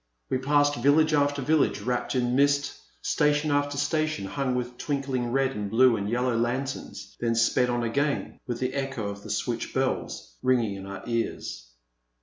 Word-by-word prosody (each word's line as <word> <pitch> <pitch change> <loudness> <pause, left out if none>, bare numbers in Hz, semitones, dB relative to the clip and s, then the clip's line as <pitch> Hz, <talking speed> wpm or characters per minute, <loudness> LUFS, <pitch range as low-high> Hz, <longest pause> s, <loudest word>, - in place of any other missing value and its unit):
We 130 - +1
passed 145 +2 +2
vil 140 +3 +5
lage 155 0 +3
after 145 -1 +2
village 155 +2 +2
wrapped 125 +1 -1
in 125 -1 +1
mist, 140 +1 +2 0.3
station 150 0 +2
after 145 0 +1
station 155 -4 0
hung 130 +5 -1
with 125 0 -4
twinkling 135 -4 -2
red 135 0 +2
and 105 -5 -4
blue 120 +2 +5
and 100 -1 -3
yellow 125 +1 +1
lanterns, 125 +4 -3
then 115 -1 0
sped 115 +2 +3
on 120 0 0
again 140 +5 -1
with 120 -2 -2
the 130 0 -1
echo 135 -6 -2
of 100 0 -7
the 105 - -10
switch 120 +2 -2
bells 130 - -2
ringing 120 -5 +2
in 95 0 -8
our 100 0 -7
ears. 115 - -3
130 Hz, 175 wpm, -27 LUFS, 115-145 Hz, 0.3 s, vil